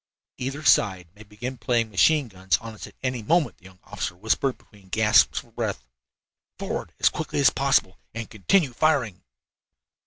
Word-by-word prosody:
"Either 135 +4 -4
side 95 -5 +3
may 105 - -16
begin 110 +5 -7
playing 115 0 0
machine 135 - +3
guns 95 -2 0
on 115 0 -9
us 110 - -9
at - - -17
any 125 -2 -2
moment," 165 +8 +1
the 95 - -23
young 95 -1 -15
officer 90 - -5
whispered, 110 +7 0
between 100 -3 -21
gasps 105 +1 +4
for - - -5
breath. - - -4 0.7
"Forward - - -4
as - - +4
quickly - - -4
as 140 - +5
possible, 135 -9 +1
and 115 -1 -6
continue 130 - +1
firing." 120 - +1
110 Hz, 165 wpm, -25 LUFS, 100-135 Hz, 0.7 s, as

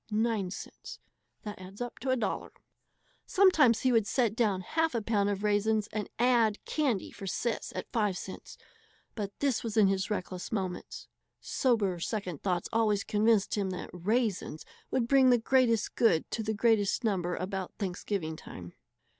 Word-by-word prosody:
09 215 -3 0
$1.00 210 +5 -5 0.8
Sometimes 320 - +5
he 260 - +3
would 225 -3 +3
set 230 -4 +1
down 210 -6 +1
half 320 - 0
a 230 - +1
pound 205 -2 +1
of 200 0 -2
"raisens" 210 +1 +2
and 210 -1 -3
add 235 -3 +3
"candy 265 -11 0
for 195 - -8
Sis, 230 +5 -2
.05," 200 -4 -3 0.6
but 205 -3 -4
this 275 -4 +1
was 225 -2 -4
in 210 -2 +6
his 190 -1 0
reckless 185 -3 -4
moments. 190 -5 -4 0.3
Sober 210 -9 +1
second 180 -4 -3
thought 180 -3 -1
always 215 -3 +2
convinced 215 -1 +2
him 200 -2 0
that 180 -1 -6
"raisens" 200 -3 -1 0.2
would 235 -3 0
bring 265 0 +5
the 245 - +6
greatest 235 -2 +2
good 225 -9 +2
to 230 - -2
the 220 0 -2
greatest 220 0 +2
number 180 -5 0
about 190 0 -4
Thanksgiving 180 -4 -3
time. 90 - -10
210 Hz, 140 wpm, -30 LUFS, 195-235 Hz, 0.8 s, in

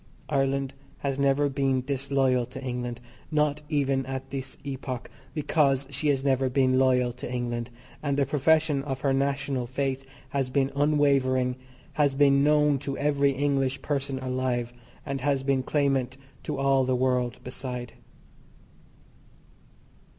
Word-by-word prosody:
Ireland 135 -1 0 0.2
has 140 -1 -2
never 140 +1 +3
been 135 -2 +1
disloyal 135 -2 +1
to 130 +1 -8
England, 125 -2 -3 0.3
not 150 -1 +1
even 140 -3 +1
at 135 0 -5
this 135 -1 -5
epoch, 135 -3 -5 0.2
because 140 -3 +2
she 145 +3 -1
has 135 -2 +2
never 135 -1 +2
been 130 0 +3
loyal 125 -2 +3
to 125 0 -7
England, 120 -1 -2 0.3
and 140 -2 -1
the 140 - +3
profession 150 +1 +2
of 135 -2 -4
her 135 -2 +2
National 135 -2 0
faith 135 +1 -2 0.3
has 135 -1 -1
been 135 +1 +1
unwavering, 140 -3 +2 0.4
has 145 -3 +2
been 140 0 +5
known 150 -1 +4
to 140 0 -4
every 140 -1 +2
English 135 -1 0
person 140 -2 -1
alive, 130 -2 -2 0.3
and 135 -2 -3
has 140 -1 +1
been 135 -1 +2
clamant 135 -2 0 0.2
to 150 - -4
all 135 -1 +3
the 130 0 +1
world 125 -1 0
beside. 125 -1 -6
135 Hz, 140 wpm, -27 LUFS, 130-140 Hz, 0.4 s, been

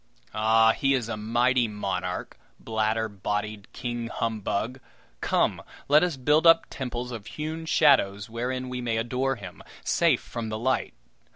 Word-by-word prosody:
Ah! 110 +1 +4
he 135 +3 +2
is 120 -4 -2
a 115 - -3
mighty 120 +3 +2
monarch, 95 -4 -4 0.2
bladder 110 0 0
bodied 105 0 -4
King 120 -1 -4
Humbug! 115 +1 -2 0.4
Come, - - +1 0.3
let 150 +3 +6
us 175 -6 0
build 150 +5 +3
up 165 0 +7
temples 125 -1 -4
of 110 -4 -7
hewn 160 +2 -5
shadows 100 -11 +3
wherein 125 +3 -3
we 125 0 -4
may 115 -2 -1
adore 130 +3 0
him, 95 -6 -10 0.2
safe - - +2
from 115 -2 -5
the 110 - -3
light. 130 +4 -1
115 Hz, 150 wpm, -26 LUFS, 110-130 Hz, 0.4 s, up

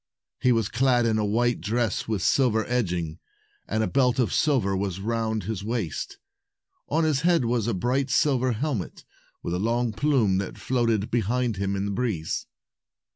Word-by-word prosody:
He 125 - +3
was 115 -4 +2
clad 120 +2 +2
in 110 -1 +2
a 105 - +1
white 120 0 +1
dress 110 +2 -1
with 105 -6 -1
silver 115 - +2
edging, 90 -10 -2 0.5
and 110 +1 0
a - - 0
belt 125 -2 +2
of 120 -8 +1
silver 125 -11 +2
was 95 -1 -2
round 110 0 -1
his 100 0 -4
waist. 110 -7 -3 0.7
On 160 +3 +2
his 150 -4 +1
head 170 -5 +3
was 115 -2 0
a 115 - 0
bright 130 +8 0
silver 130 -2 +2
helmet, 120 - -3 0.4
with 85 - -3
a 90 - -1
long 115 +2 0
plume 115 -9 +2
that 95 - -5
floated 115 -5 0
behind 120 0 0
him 100 0 -1
in 100 0 -2
the 100 - -2
breeze. 100 -8 -2
115 Hz, 175 wpm, -25 LUFS, 100-125 Hz, 0.7 s, He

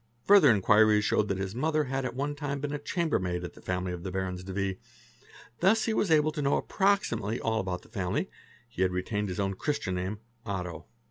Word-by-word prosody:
Further 200 -8 +7
inquiries 105 0 +5
showed 105 - +2
that 95 - -1
his 95 0 -3
mother 155 +5 +1
had 135 -1 -2
at 125 -1 -4
one 145 +2 -1
time 145 -1 -4
been 145 +1 -3
a 145 - -2
chamber 165 +2 0
maid 90 -1 -2
in 90 - -5
the - - -15
family 90 0 -2
of 90 -1 -5
the 95 - -4
Barons 90 -1 -3
de 95 - -7
V., 95 -1 -2 0.8
thus 215 +5 +3
he 225 - 0
was 210 - +1
able 155 -1 +4
to 150 -1 -4
know 140 0 +2
approximately 125 - 0
all 110 -1 0
about 90 -2 -3
the - - -17
family; 95 -6 -2 0.4
he 115 -5 -6
had 95 - +4
retained 100 +3 -2
his 90 - -4
own 100 -1 0
Christian 95 -2 -2
name, 95 +3 -3 0.3
Otto. 90 -6 -5
105 Hz, 220 wpm, -29 LUFS, 95-145 Hz, 0.8 s, Further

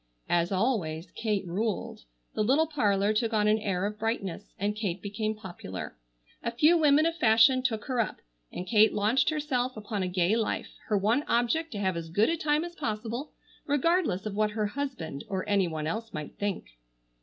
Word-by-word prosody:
As 175 +1 +2
always, 185 -6 -1
Kate 210 -3 -1
ruled. 195 - -3 0.3
The 215 - 0
little 275 +8 +4
parlor 210 -9 +1
took 225 +1 0
on 210 -1 +3
an 215 +1 +4
air 195 -3 -1
of 210 +1 -4
brightness, 205 -4 -3
and 205 +2 -1
Kate 200 -4 -2
became 215 +2 -3
popular. 175 - -7 0.5
A - - 0
few 300 +8 +4
women 305 -1 +5
of 330 0 +1
fashion 230 +1 +5
took 225 -5 -1
her 255 -2 -1
up, 220 - 0 0.4
and 180 - -5
Kate 215 +1 +4
launched 220 +6 +3
herself 260 -6 -1
upon 210 -1 -3
a 185 - 0
gay 180 +3 +2
life, 225 -2 -2
her 210 - +2
one 220 +7 +2
object 305 +8 +1
to - - -4
have 190 -3 0
as 165 -1 -5
good 205 +7 +3
a 335 - +2
time 305 0 +1
as 345 - -8
possible, 235 0 -4 0.3
regardless 290 - +1
of 215 - -3
what 215 +1 +1
her 210 0 -1
husband 205 - -4
or 190 -2 -2
any 200 -3 +3
one 155 -2 -4
else 225 +7 -3
might 150 -1 -6
think. 180 - -4
215 Hz, 190 wpm, -28 LUFS, 195-255 Hz, 0.5 s, women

